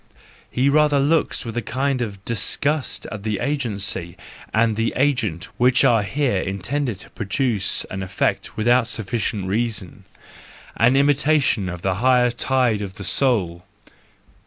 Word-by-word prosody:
He 130 Hz, +2 st, +1 dB
rather 145 Hz, 0 st, +4 dB
looks 150 Hz, 0 st, +1 dB
with 115 Hz, -1 st, -6 dB
a -, -, +1 dB
kind 130 Hz, +3 st, -1 dB
of 100 Hz, -4 st, -5 dB
disgust 140 Hz, +5 st, -1 dB
at 110 Hz, -, -6 dB
the 105 Hz, -1 st, -2 dB
agency 100 Hz, -, -2 dB, 0.3 s
and 110 Hz, 0 st, +2 dB
the 115 Hz, +1 st, -1 dB
agent 125 Hz, -, 0 dB
which 125 Hz, 0 st, +4 dB
are 115 Hz, -2 st, +4 dB
here 125 Hz, -1 st, 0 dB
intended 100 Hz, +5 st, -3 dB
to -, -, -15 dB
produce 110 Hz, -1 st, 0 dB
an 95 Hz, -, -6 dB
effect 95 Hz, 0 st, -2 dB
without 120 Hz, +2 st, +3 dB
sufficient 105 Hz, -2 st, -3 dB
reason,—an 110 Hz, +3 st, -3 dB
imitation 140 Hz, -7 st, +2 dB
of 90 Hz, -1 st, -7 dB
the 95 Hz, -, +1 dB
high 125 Hz, -1 st, +4 dB
tide 125 Hz, -3 st, +1 dB
of 95 Hz, -2 st, -6 dB
the 100 Hz, -, -8 dB
soul! 95 Hz, -4 st, +1 dB
115 Hz, 135 wpm, -22 LUFS, 100-135 Hz, 0.3 s, rather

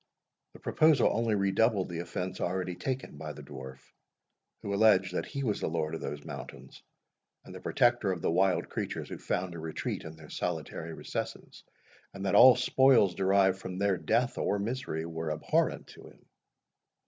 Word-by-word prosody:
The -, -, -14 dB
proposal 155 Hz, -4 st, +3 dB
only 115 Hz, -1 st, +1 dB
redoubled 100 Hz, 0 st, +2 dB
the 85 Hz, -1 st, -5 dB
offence 90 Hz, +1 st, -4 dB
already 90 Hz, 0 st, -1 dB
taken 125 Hz, -, -4 dB
by 75 Hz, 0 st, -6 dB
the 75 Hz, +1 st, -11 dB
dwarf, 65 Hz, -2 st, -9 dB, 0.9 s
who 100 Hz, -, -3 dB
alleged 100 Hz, -3 st, +4 dB
that -, -, -2 dB
he 140 Hz, -2 st, -4 dB
was 105 Hz, -5 st, 0 dB
the -, -, -1 dB
lord 80 Hz, -1 st, -2 dB
of 80 Hz, -, -4 dB
those 75 Hz, 0 st, -6 dB
mountains, -, -, -9 dB, 0.6 s
and -, -, -11 dB
the -, -, -8 dB
protector 120 Hz, -5 st, +2 dB
of 90 Hz, -, -3 dB
the -, -, +2 dB
wild 95 Hz, +2 st, +2 dB
creatures -, -, -4 dB
who -, -, -7 dB
found 90 Hz, 0 st, -2 dB
a 85 Hz, -, -7 dB
retreat 80 Hz, 0 st, -4 dB
in 80 Hz, 0 st, -9 dB
their 80 Hz, -2 st, -14 dB
solitary 80 Hz, -1 st, -4 dB
recesses; -, -, -6 dB, 0.5 s
and 100 Hz, 0 st, -5 dB
that 95 Hz, -, 0 dB
all 130 Hz, 0 st, +9 dB
spoils 125 Hz, -6 st, +4 dB
derived 95 Hz, 0 st, +3 dB
from 95 Hz, -1 st, -6 dB
their 100 Hz, 0 st, +2 dB
death, 120 Hz, +10 st, 0 dB
or 100 Hz, -, +1 dB
misery, 105 Hz, -6 st, -3 dB
were 80 Hz, -1 st, -4 dB
abhorrent 75 Hz, -, 0 dB
to -, -, -13 dB
him. -, -, -19 dB
95 Hz, 175 wpm, -30 LUFS, 80-110 Hz, 0.9 s, all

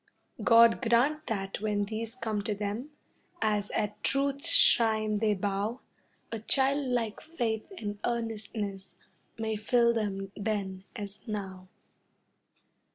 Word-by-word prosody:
God 230 Hz, 0 st, +6 dB
grant 265 Hz, +6 st, +2 dB
that 195 Hz, -2 st, -3 dB
when 210 Hz, -1 st, 0 dB
these 225 Hz, +2 st, -4 dB
come 220 Hz, -4 st, -2 dB
to 210 Hz, -, 0 dB
them, 210 Hz, +7 st, -4 dB, 0.5 s
As 210 Hz, -1 st, 0 dB
at 210 Hz, -1 st, -2 dB
Truth's 280 Hz, +3 st, +1 dB
shrine 220 Hz, -8 st, +4 dB
they 215 Hz, -1 st, +2 dB
bow, 205 Hz, +5 st, -2 dB, 0.5 s
A 225 Hz, -, -3 dB
childlike 255 Hz, -2 st, +1 dB
faith 235 Hz, -, -3 dB
and 205 Hz, -5 st, -5 dB
earnestness 215 Hz, -4 st, -3 dB, 0.4 s
May 220 Hz, -1 st, -1 dB
fill 235 Hz, +2 st, +3 dB
them 195 Hz, -3 st, -2 dB
then 195 Hz, -3 st, -3 dB
as 205 Hz, -2 st, -7 dB
now. 190 Hz, -3 st, -5 dB
220 Hz, 115 wpm, -30 LUFS, 205-235 Hz, 0.5 s, God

